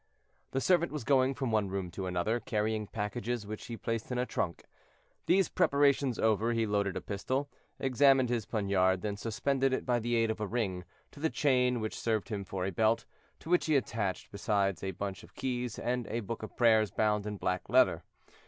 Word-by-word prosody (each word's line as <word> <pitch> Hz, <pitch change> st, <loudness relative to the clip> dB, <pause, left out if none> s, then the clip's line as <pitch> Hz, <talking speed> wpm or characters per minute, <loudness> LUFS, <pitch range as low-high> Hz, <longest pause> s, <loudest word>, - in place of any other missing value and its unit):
The 135 Hz, -, -1 dB
servant 175 Hz, +2 st, +3 dB
was 150 Hz, -4 st, -4 dB
going 135 Hz, +1 st, +3 dB
from 130 Hz, -4 st, -2 dB
one 105 Hz, -3 st, +1 dB
room 95 Hz, -2 st, -3 dB
to 95 Hz, +1 st, -4 dB
another, 90 Hz, +6 st, 0 dB
carrying 110 Hz, -1 st, -1 dB
packages 105 Hz, +2 st, -3 dB
which 105 Hz, +1 st, -7 dB
he 115 Hz, -1 st, -5 dB
placed 115 Hz, +1 st, -3 dB
in 125 Hz, -, -1 dB
a 125 Hz, -, +1 dB
trunk. 85 Hz, -8 st, -3 dB, 0.6 s
These 185 Hz, 0 st, +4 dB
preparations 140 Hz, -3 st, +3 dB
over, 110 Hz, +1 st, +2 dB
he 115 Hz, -1 st, +1 dB
loaded 100 Hz, -2 st, 0 dB
a -, -, -4 dB
pistol, 130 Hz, +8 st, -2 dB, 0.3 s
examined 135 Hz, 0 st, +4 dB
his 115 Hz, -4 st, -1 dB
poniard, 95 Hz, -4 st, +1 dB
then 105 Hz, -1 st, -2 dB
suspended 130 Hz, +5 st, 0 dB
it, -, -, -1 dB
by 125 Hz, -1 st, +2 dB
the 120 Hz, +1 st, -1 dB
aid 115 Hz, -1 st, +2 dB
of 110 Hz, 0 st, -5 dB
a 105 Hz, -, -1 dB
ring, 95 Hz, -5 st, -2 dB, 0.3 s
to -, -, -14 dB
the 160 Hz, +2 st, +1 dB
chain 125 Hz, -5 st, +2 dB
which 110 Hz, -, -4 dB
served 110 Hz, -5 st, -1 dB
him 100 Hz, -2 st, -3 dB
for 95 Hz, -1 st, -4 dB
a 95 Hz, -, -1 dB
belt, 110 Hz, +4 st, +2 dB, 0.4 s
to -, -, -10 dB
which 180 Hz, -, +3 dB
he 155 Hz, -, +3 dB
attached 105 Hz, -6 st, -1 dB
besides 100 Hz, -3 st, 0 dB
a 95 Hz, -, -1 dB
bunch 95 Hz, +1 st, -5 dB
of -, -, -17 dB
keys 125 Hz, -3 st, -3 dB
and 125 Hz, -1 st, -2 dB
a 115 Hz, -, -2 dB
book 115 Hz, +2 st, -5 dB
of 110 Hz, -, -9 dB
prayers 110 Hz, -3 st, +4 dB
bound 105 Hz, -1 st, 0 dB
in 105 Hz, -1 st, -4 dB
black 90 Hz, -1 st, -2 dB
leather. -, -, +4 dB
110 Hz, 205 wpm, -31 LUFS, 100-125 Hz, 0.6 s, These